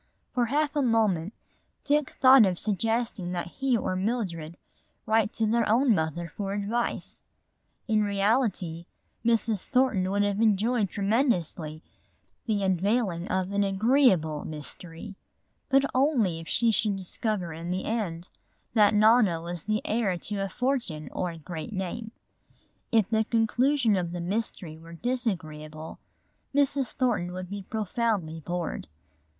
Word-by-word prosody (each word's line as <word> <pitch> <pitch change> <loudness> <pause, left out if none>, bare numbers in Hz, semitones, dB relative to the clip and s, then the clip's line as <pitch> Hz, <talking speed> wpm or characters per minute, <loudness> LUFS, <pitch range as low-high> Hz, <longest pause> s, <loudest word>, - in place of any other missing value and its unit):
For 245 -2 +1
half 295 +3 0
a 290 - +2
moment 215 -8 +2 0.5
Dick 295 -1 +1
thought 260 -2 +8
of 180 -2 -1
suggesting 220 -2 -1
that 175 -1 -2
he 265 -3 +2
or 185 -3 -2
Mildred 185 -6 -2 0.5
write 220 -1 +2
to 225 - 0
their 225 0 +1
own 240 +2 +4
mother 160 -1 -1
for 195 +3 -4
advice. 215 +4 -2 0.7
In 215 -2 +3
reality 200 -5 0 0.4
Mrs. 225 -3 +2
Thornton 250 -8 +1
would 200 +1 +1
have 205 +1 0
enjoyed 220 0 +2
tremendously 185 - 0 0.6
the 210 -3 0
unveiling 190 -1 0
of 185 0 -1
an 200 0 +2
agreeable 195 - +3
mystery. 165 +4 -6 0.6
But 275 0 +4
only 250 - +2
if 165 - -10
she 235 -1 +2
should 210 -1 +1
discover 190 -1 -2
in 165 +2 -6
the 185 +1 -2
end 185 -6 -3 0.4
that 210 -2 +5
Nona 215 -5 +5
was 170 0 -6
the 215 +1 0
heir 210 -5 0
to 205 +4 -4
a 195 0 -2
fortune 240 - -2
or 180 - -2
a 165 - -8
great 165 +5 -7
name. 195 +4 -4 0.8
If 220 -4 +3
the 220 0 +3
conclusion 235 +2 +2
of 175 -2 -2
the 175 - -4
mystery 175 -4 -4
were 165 +1 -12
disagreeable 160 -9 -4 0.6
Mrs. 280 -3 +2
Thornton 210 -9 0
would 185 0 -6
be 200 0 -4
profoundly 210 -5 -2
bored. 175 - -4
205 Hz, 140 wpm, -27 LUFS, 175-230 Hz, 0.8 s, thought